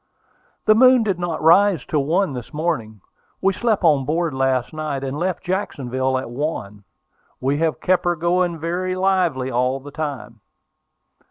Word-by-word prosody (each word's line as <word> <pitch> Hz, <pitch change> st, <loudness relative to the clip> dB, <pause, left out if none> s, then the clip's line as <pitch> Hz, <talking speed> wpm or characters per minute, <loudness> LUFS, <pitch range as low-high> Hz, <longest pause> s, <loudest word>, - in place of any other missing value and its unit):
"The 215 Hz, -, +6 dB
moon 255 Hz, +1 st, +6 dB
did 195 Hz, -5 st, -1 dB
not 170 Hz, -3 st, -3 dB
rise 175 Hz, -1 st, +4 dB
till 145 Hz, -3 st, -1 dB
one 175 Hz, +1 st, +1 dB
this 125 Hz, -2 st, -7 dB
morning. 150 Hz, -, -3 dB, 0.4 s
We 195 Hz, 0 st, +2 dB
slept 220 Hz, -1 st, 0 dB
on 150 Hz, -5 st, +4 dB
board 160 Hz, +3 st, -1 dB
last 130 Hz, -1 st, 0 dB
night, 150 Hz, -3 st, -4 dB
and 135 Hz, 0 st, -3 dB
left 180 Hz, 0 st, -2 dB
Jacksonville 130 Hz, -9 st, -2 dB
at 130 Hz, -, -4 dB
one. 115 Hz, -8 st, -4 dB, 0.5 s
We 140 Hz, +3 st, 0 dB
have 160 Hz, -1 st, 0 dB
kept 180 Hz, -1 st, +1 dB
her 175 Hz, 0 st, +2 dB
going 175 Hz, +1 st, 0 dB
very 180 Hz, +3 st, -2 dB
lively 180 Hz, -9 st, +1 dB
all 125 Hz, +2 st, 0 dB
the 145 Hz, +2 st, -11 dB
time." 140 Hz, -7 st, -5 dB
160 Hz, 160 wpm, -21 LUFS, 130-180 Hz, 0.5 s, The